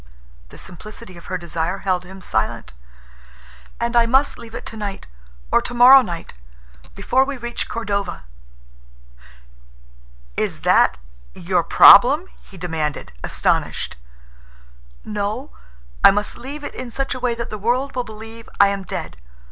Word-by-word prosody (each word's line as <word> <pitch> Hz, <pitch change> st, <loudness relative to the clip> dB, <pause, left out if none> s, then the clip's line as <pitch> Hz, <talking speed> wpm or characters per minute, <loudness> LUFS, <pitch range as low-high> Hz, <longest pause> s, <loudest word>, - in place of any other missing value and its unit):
The -, -, -14 dB
simplicity 200 Hz, +2 st, -10 dB
of 170 Hz, -, -13 dB
her 185 Hz, -, -2 dB
desire 170 Hz, +1 st, -3 dB
held 185 Hz, -2 st, -1 dB
him 190 Hz, +1 st, -12 dB
silent. -, -, -2 dB, 1.1 s
"And 235 Hz, +1 st, -2 dB
I 235 Hz, -1 st, +4 dB
must 265 Hz, +4 st, +2 dB
leave 230 Hz, -1 st, -11 dB
it -, -, -7 dB
tonight, 205 Hz, -3 st, -6 dB, 0.5 s
or -, -, +4 dB
tomorrow 250 Hz, +3 st, +7 dB
night—before 60 Hz, -, -4 dB
we 275 Hz, 0 st, -5 dB
reach 240 Hz, 0 st, -5 dB
Cordova." 200 Hz, -, -3 dB, 2.1 s
"Is -, -, -2 dB
that—your -, -, 0 dB
problem?" 285 Hz, -, +7 dB
he 195 Hz, -, -16 dB
demanded, 160 Hz, -, -3 dB
astonished. -, -, -1 dB, 1.1 s
"No. 210 Hz, +6 st, -4 dB, 0.5 s
I -, -, +10 dB
must 205 Hz, +1 st, -1 dB
leave 285 Hz, +4 st, -8 dB
it -, -, -6 dB
in 255 Hz, -1 st, -7 dB
such 270 Hz, +4 st, -3 dB
a 255 Hz, -, -6 dB
way 245 Hz, -2 st, -1 dB
that 235 Hz, 0 st, -6 dB
the 215 Hz, -, -5 dB
world 250 Hz, +6 st, -1 dB
will 250 Hz, -, -1 dB
believe 225 Hz, +1 st, -11 dB
I 200 Hz, -, +7 dB
am 200 Hz, 0 st, -3 dB
dead. 170 Hz, -, -6 dB
210 Hz, 130 wpm, -20 LUFS, 175-240 Hz, 2.1 s, I